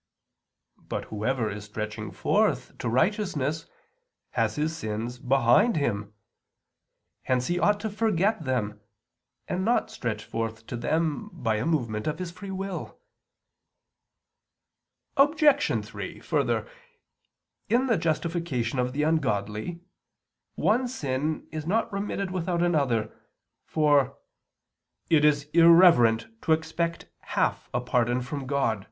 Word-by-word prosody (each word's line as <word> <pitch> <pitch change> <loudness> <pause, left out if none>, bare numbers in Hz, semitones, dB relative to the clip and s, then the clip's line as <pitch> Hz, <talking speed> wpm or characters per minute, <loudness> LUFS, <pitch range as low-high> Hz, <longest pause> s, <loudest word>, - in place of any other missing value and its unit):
But - - -5
whoever 115 +2 0
is 105 0 -7
stretching 105 0 -5
forth - - 0
to - - -2
righteousness 160 - 0 0.6
has - - 0
his 155 +2 -1
sins 115 -1 -4
behind 130 - +4
him. 105 -7 -2 1.1
Hence 125 -1 0
he 175 +3 0
ought 205 +2 +3
to 220 - -2
forget 210 -2 +1
them, 105 -6 -2 0.7
and 185 - -1
not 235 +4 +1
stretch 110 -3 -4
forth 115 0 -4
to 120 - -6
them 160 - -1
by 120 - -1
a 110 - -1
movement 115 -9 -1
of 155 - -1
his 180 -2 -5
free 185 +3 -9
will. 190 -1 -5 2.2
Obj. 290 0 +4
3: - - -7
Further, - - 0 1.0
in 245 +3 +3
the 235 -4 +3
justification 155 -6 -1
of 125 0 0
the 150 +2 0
ungodly 135 - -1 0.7
one 245 +4 +2
sin 150 - -2
is 155 -1 -5
not 225 +3 0
remitted 200 -1 -2
without 175 -1 -1
another, 135 -11 +1 0.5
for 145 -4 +2 0.9
"it 155 -2 +5
is 145 -1 +4
irreverent 165 -9 +6 0.2
to 160 - +3
expect 165 +1 -2
half - - -1
a 125 - 0
pardon 125 0 +1
from 135 +1 -5
God" - - -8
[*Cap., 140 -5 +2
Sunt. 105 - -8
150 Hz, 125 wpm, -27 LUFS, 120-180 Hz, 2.2 s, irreverent